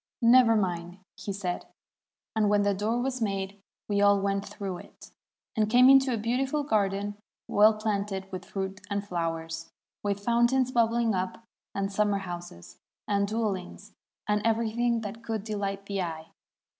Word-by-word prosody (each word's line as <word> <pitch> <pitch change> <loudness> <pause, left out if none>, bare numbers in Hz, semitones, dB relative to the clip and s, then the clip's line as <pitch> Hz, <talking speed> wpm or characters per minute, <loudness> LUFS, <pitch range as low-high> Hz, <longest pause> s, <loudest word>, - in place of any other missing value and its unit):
'Never 235 -1 +7
mind,' 175 -3 -1 0.2
said 195 -3 -4
he; - - -29 0.7
and 215 -2 +3
when 205 0 +3
the 205 0 +2
door 215 +5 0
was 255 0 -2
made, 195 -1 -2 0.3
we 205 -1 +1
all 200 0 +5
went 195 0 0
through 190 -3 -5
it, - - -14 0.4
and 215 -2 +2
came 250 +3 +7
into 270 -1 +6
a 235 - 0
beautiful 260 +6 0
garden 205 -5 0 0.3
well 215 +1 +5
planted 200 -3 -2
with 185 0 -5
fruit 195 0 -4
and 200 0 -2
flowers, 165 -2 -3 0.3
with 200 -1 -1
foun 235 0 +4
tains 260 0 +1
bubbling 230 -1 +2
up, 185 +4 -3 0.3
and 195 0 -2
summer 205 0 +2
houses, 175 - -8 0.3
and 200 0 +1
dwellings, 205 -3 -3 0.3
and 210 0 +2
everything 230 +1 +1
that 220 +2 -7
could 220 -3 -3
delight 200 -2 -3
the 200 -1 -2
eye. 160 -2 -5
205 Hz, 155 wpm, -28 LUFS, 195-225 Hz, 0.7 s, Never